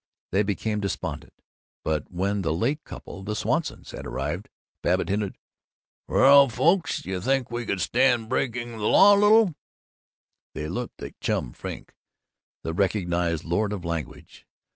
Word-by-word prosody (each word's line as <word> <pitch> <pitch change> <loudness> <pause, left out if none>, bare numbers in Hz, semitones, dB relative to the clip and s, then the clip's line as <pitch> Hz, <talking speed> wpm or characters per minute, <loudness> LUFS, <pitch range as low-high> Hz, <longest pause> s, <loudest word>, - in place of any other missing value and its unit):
They 95 - +3
became 105 +1 -1
despondent. 90 -6 -4 0.5
But 75 -2 -1
when 100 +3 -1
the 80 -3 0
late 135 - -1
couple 95 - -9
(the 105 +2 -4
Swansons) - - -2
had - - -7
arrived, - - -4 0.3
Babbitt - - +1
hinted, 100 0 -1 0.7
"Well, 140 0 +7
folks, 160 +7 +1
do 95 - -6
you 90 -1 -2
think 135 +2 0
you 120 0 -2
could 95 - -1
stand 120 -2 +2
breaking 120 -1 -2
the 105 - 0
law 205 +1 +7
a 200 - +2
little?" 210 -3 +5 1.0
They 75 - -4
looked 120 +9 -5
at - - -9
Chum - - -1
Frink, - - -8 0.7
the 80 - -3
recognized 85 -4 0
lord 100 +5 0
of 95 -4 -5
language. 85 -2 -6
105 Hz, 150 wpm, -25 LUFS, 90-125 Hz, 1.0 s, Well